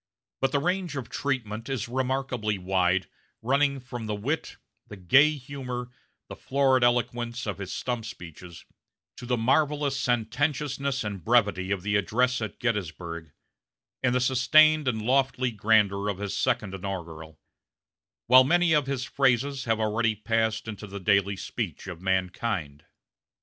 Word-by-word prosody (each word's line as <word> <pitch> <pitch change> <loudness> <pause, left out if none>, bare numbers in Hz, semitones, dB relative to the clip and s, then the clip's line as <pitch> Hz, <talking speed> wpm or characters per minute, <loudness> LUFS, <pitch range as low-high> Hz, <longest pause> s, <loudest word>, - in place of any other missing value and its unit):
But 135 - +1
the 140 - +2
range 180 +1 -1
of 135 -4 -5
treatment 115 -4 -3
is 130 -5 -2
remarkably 125 -4 -1
wide, 90 0 +1 0.4
running 140 +3 +2
from 120 -3 -7
the 105 - -2
wit, 140 +10 -3 0.3
the 105 - -9
gay 140 - +5
humor, 125 -3 -6 0.4
the - - -8
florid 135 -2 +2
eloquence 120 0 0
of 100 -3 -4
his 95 -2 -6
stump 120 -3 -3
speeches, 85 -4 -10 0.5
to 125 - -9
the 125 0 +1
marvelous 140 +3 +1
sententiousness 135 +3 -1
and 100 -4 -5
brevity 105 -4 +2
of 100 -2 -1
the 105 0 +1
address 125 +5 +1
at 110 - -5
Gettysburg, 85 -7 -3 0.7
and 125 -1 +1
the - - +3
sustained 150 +4 +4
and 110 -4 -1
lofty 130 0 +1
grandeur 105 -2 +2
of 100 - -3
his 100 0 -4
second 110 -6 0
inaugural; 85 -5 -7 0.9
while 130 +2 +8
many 175 +4 +3
of 150 -3 +2
his 135 -2 -2
phrases 135 0 +1
have 115 -2 +1
already 110 +1 +1
passed 110 +1 -1
into 105 -1 -7
the 100 +1 -7
daily 100 0 +2
speech 95 - -5
of 90 -3 -8
mankind. 90 -5 -2
115 Hz, 145 wpm, -27 LUFS, 100-130 Hz, 0.9 s, while